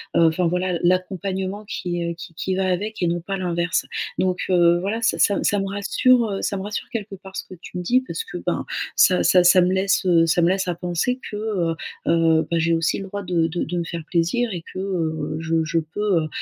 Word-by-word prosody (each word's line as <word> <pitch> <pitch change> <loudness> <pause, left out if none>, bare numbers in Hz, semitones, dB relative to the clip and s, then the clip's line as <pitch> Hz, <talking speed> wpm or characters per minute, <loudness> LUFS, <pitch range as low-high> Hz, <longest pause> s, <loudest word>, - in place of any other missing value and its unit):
heu, 170 -1 +6
enfin 170 +2 +1
voilà, 180 0 -1
l'accompagnement 190 +2 -1
qui, 175 -5 -3
heu, 170 - -2
qui 165 0 -10
qui 185 +3 -2
va 190 0 0
avec 210 +4 -3
et 175 - +2
non 170 +1 0
pas 195 +4 -4
l'inverse, 175 -2 -1 0.3
donc, 185 -1 0
heu, 175 -1 +4
voilà, 205 +5 -2
ça 225 - +1
ça 200 -2 +3
ça 205 - +2
me 195 - -2
rassure, 220 +5 +3
heu, 195 - -3
ça - - -1
me - - -4
rassure 205 +1 -4
quelque 215 -4 -5
part 190 0 -13
ce - - -3
que 185 - -11
tu 180 - -8
me 180 - -3
dis 250 +8 +3
parce - - -4
que 450 - -7
ben, - - -2 0.3
ça 180 - +5
ça 180 -1 +5
ça 180 +1 +7
me 180 +1 +2
laisse, 190 0 +1
heu, 170 -2 +5
ça 165 +1 +2
me 170 - +4
laisse 190 0 0
à - - +1
penser 180 +8 -1
que, - - -6
heu 200 -6 -1 0.3
heu, 165 -1 +3
bah 170 - +1
j'ai 165 +1 +1
aussi 165 0 +1
le 195 - -6
droit 200 +1 -5
de 175 -3 +1
de 170 +2 -2
de 175 +2 -3
me 170 - 0
faire 170 -1 -5
plaisir 180 +9 0
et 170 -2 -5
que, 185 - -5
heu, 165 -6 -2
je 165 0 +1
je 165 +1 +1
peux, 175 +3 0
heu - - -3
180 Hz, 250 wpm, -22 LUFS, 170-195 Hz, 0.3 s, ça